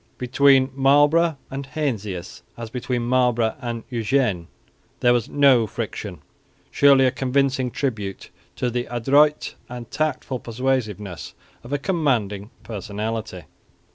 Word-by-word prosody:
Between 130 +1 +4
Marlborough 145 +4 +4
and 135 +1 -4
Heinsius, 105 - -4 0.2
as 115 -1 -7
between 125 -1 -2
Marlborough 120 -2 +2
and 120 -2 -4
Eugene, 115 -7 0 0.5
there 120 0 +4
was 120 -2 0
no 135 -6 +4
friction - - -6 0.5
surely 140 -2 +5
a 130 - +3
convincing 130 0 0
tribute 110 -8 -4 0.2
to 125 - -1
the 120 +1 -2
adroit 140 +6 +2 0.2
and 120 -2 -8
tactful 145 -4 -2
persuasiveness 110 -7 -3 0.3
of 120 - -11
a 145 - +1
commanding 125 - -1
personality. 105 -2 -5
125 Hz, 115 wpm, -22 LUFS, 110-135 Hz, 0.5 s, surely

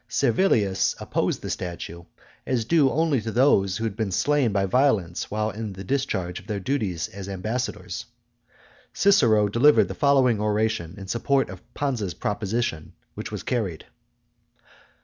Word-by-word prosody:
Servilius 115 - +2
opposed - - -1
the - - -4
statue, 85 -1 -5 0.4
as 120 -4 0
due 150 -1 +4
only 155 -3 +1
to 110 - -4
those 100 -7 +3
who 115 - -4
had 110 -3 -2
been 110 -3 -2
slain 145 +3 +2
by 100 -1 +1
violence 100 -6 +1
while 110 +1 -1
in 105 0 -5
discharge 95 -3 -2
of 95 - -17
their 105 -3 -2
duties 100 - -2
as 100 0 -8
ambassadors. 110 +7 -4 0.9
Cicero 115 - +4
delivered 125 +9 +5
the - - -3
following 135 -6 +3
oration 105 -5 0
in 95 - -8
support 135 +2 +1
of 95 -1 -10
Pansa's 115 - -2
proposition, 105 -5 -2 0.2
which - - -7
was - - -5
carried. 105 -10 -2
110 Hz, 145 wpm, -25 LUFS, 95-130 Hz, 0.9 s, delivered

